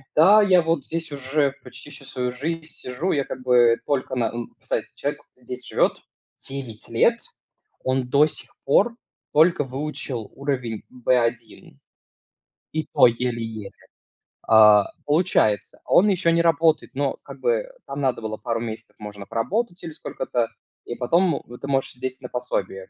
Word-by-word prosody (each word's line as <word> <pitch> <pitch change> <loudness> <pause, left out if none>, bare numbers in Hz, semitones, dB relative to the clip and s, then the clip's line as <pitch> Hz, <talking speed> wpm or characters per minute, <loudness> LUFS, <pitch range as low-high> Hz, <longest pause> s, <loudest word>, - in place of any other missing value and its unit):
"Да, 195 +8 +7
я 185 -3 +5
вот 165 +1 0
здесь 165 -2 -4
уже 140 0 0
почти - - -11
всю 145 - -12
свою 125 -1 -3
жизнь 160 +6 -4
сижу. 130 +9 -3
Я 140 - +1
как - - -7
бы 120 -2 +5
только 130 -2 -1
на, 120 -2 +1
н" 120 +1 -5
Кстати, - - -2
человек 145 +1 -3
здесь 125 0 -9
живёт - - +2 0.6
9 130 -5 -7
лет. 230 - +3 0.6
Он 130 -1 0
до 140 +3 +5
сих - - -10
пор 210 +12 +3 0.4
только 160 0 +5
выучил 135 -3 -5
уровень 125 -6 -3
B1, 120 -2 -1 1.0
и 155 -1 -2
то - - +7
еле-еле. 115 -3 -3 0.8
А, 105 -2 +7 0.2
получается, 145 - +1
он 205 +4 +5
еще 180 -3 +2
не 170 0 +3
работает, 165 -2 +2
но 140 0 -1
как - - -11
бы - - 0 0.2
там 140 - -5
надо 130 -4 0
было 110 -1 -4
пару 115 -2 -2
месяцев, 110 -1 -7
можно 105 -1 -8
поработать 180 - -2
или 165 - -6
сколько-то, 125 -5 -2 0.4
и 120 - -5
потом 165 +6 +2
вот 120 +1 -12
ты - - -5
можешь 135 -1 0
сидеть 130 +1 -5
на 125 - -7
пособии, 125 -6 -3
130 Hz, 155 wpm, -23 LUFS, 120-160 Hz, 1.0 s, Да